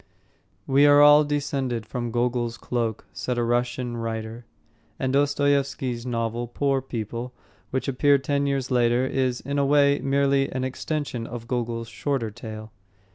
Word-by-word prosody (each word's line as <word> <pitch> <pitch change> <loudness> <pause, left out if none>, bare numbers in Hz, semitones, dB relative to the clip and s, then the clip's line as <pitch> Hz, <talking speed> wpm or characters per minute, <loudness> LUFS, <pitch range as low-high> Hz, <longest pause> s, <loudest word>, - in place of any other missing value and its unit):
"We 140 +2 +5
are 145 0 +7
all 145 +1 +8
descended 140 -5 -2
from 120 +1 -4
Gogol's 120 0 -1
Cloak," 115 -3 -3
said 125 -1 -3
a 120 - +1
Russian 120 +1 -1
writer. 115 0 -5 0.5
And 130 0 -1
Dostoyevsky's 140 -3 +1
novel, 115 0 -2
Poor 135 +2 0
People, 120 0 -5 0.4
which 130 +4 -2
appeared 140 +1 +3
ten 140 +1 0
years 135 -2 -1
later, 120 0 +3
is, 130 -2 -1
in 140 +2 -2
a - - +3
way, 140 0 +4
merely 140 0 +1
an 130 0 -2
extension 130 -2 -3
of 115 -1 -7
Gogol's 115 -2 -2
shorter 115 0 -2
tale. 110 +1 -9
125 Hz, 145 wpm, -25 LUFS, 120-140 Hz, 0.5 s, all